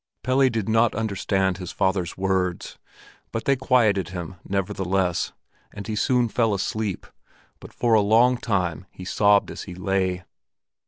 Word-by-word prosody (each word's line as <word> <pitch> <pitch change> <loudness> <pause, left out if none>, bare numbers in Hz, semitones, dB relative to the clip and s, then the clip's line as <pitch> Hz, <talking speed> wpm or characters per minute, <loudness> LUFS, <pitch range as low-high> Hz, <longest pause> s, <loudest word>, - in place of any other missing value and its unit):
Pelle 130 +1 +3
did 110 -4 -2
not 115 +1 +3
understand 95 -3 0
his 90 -2 -6
father's 95 -3 -1
words, 95 -2 -1 0.5
but 115 - -4
they 140 - +3
quieted 120 -8 +2
him 90 -1 -6
nevertheless, 95 -2 -1 0.4
and 100 -1 -8
he 110 +1 -3
soon 125 +2 +2
fell 115 -2 +1
asleep; 100 0 -3 0.5
but - - -12
for 120 -2 0
a 110 - +6
long 115 +5 +4
time 90 -6 -2
he 90 - -11
sobbed 100 +1 +3
as - - -7
he 90 - -7
lay. 95 -1 -1
100 Hz, 150 wpm, -24 LUFS, 95-115 Hz, 0.5 s, a